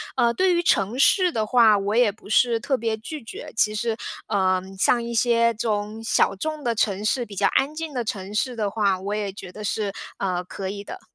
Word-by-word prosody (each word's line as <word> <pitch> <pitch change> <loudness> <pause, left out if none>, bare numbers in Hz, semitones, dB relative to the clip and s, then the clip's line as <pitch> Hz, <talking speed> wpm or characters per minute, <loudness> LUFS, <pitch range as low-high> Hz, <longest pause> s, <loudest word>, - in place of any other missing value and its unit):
呃， 235 0 +3
对 370 +2 +2
于 345 - +1
城 210 - +2
市 360 +6 +4
的 220 -5 -1
话， 220 -2 +5
我 200 +2 -1
也 235 -4 +4
不 205 - -17
是 230 +1 +3
特 265 +3 0
别 225 -1 -2
拒 280 +5 -8
绝， 225 - -9
其 215 -1 +2
实， 225 +1 -1 0.3
嗯， 190 -2 0
像 235 +5 +2
一 235 - -5
些 235 0 +3
这 220 - -21
种 210 +1 -2
小 200 - +2
众 310 +8 -4
的 235 -2 +1
城 210 -2 0
市， 240 +1 0
比 205 - -10
较 - - +1
安 285 +3 +2
静 320 -2 -5
的 245 -2 -1
城 200 -2 -5
市 245 +3 -1
的 210 -3 -1
话， 200 -4 +1
我 200 +2 -4
也 210 -2 -2
觉 190 -2 -10
得 210 - -9
是， 205 -1 -2 0.2
呃， 180 -2 -1
可 190 +1 -6
以 200 +1 -6
的。 - - -8
220 Hz, 250 characters per minute, -24 LUFS, 200-240 Hz, 0.3 s, 话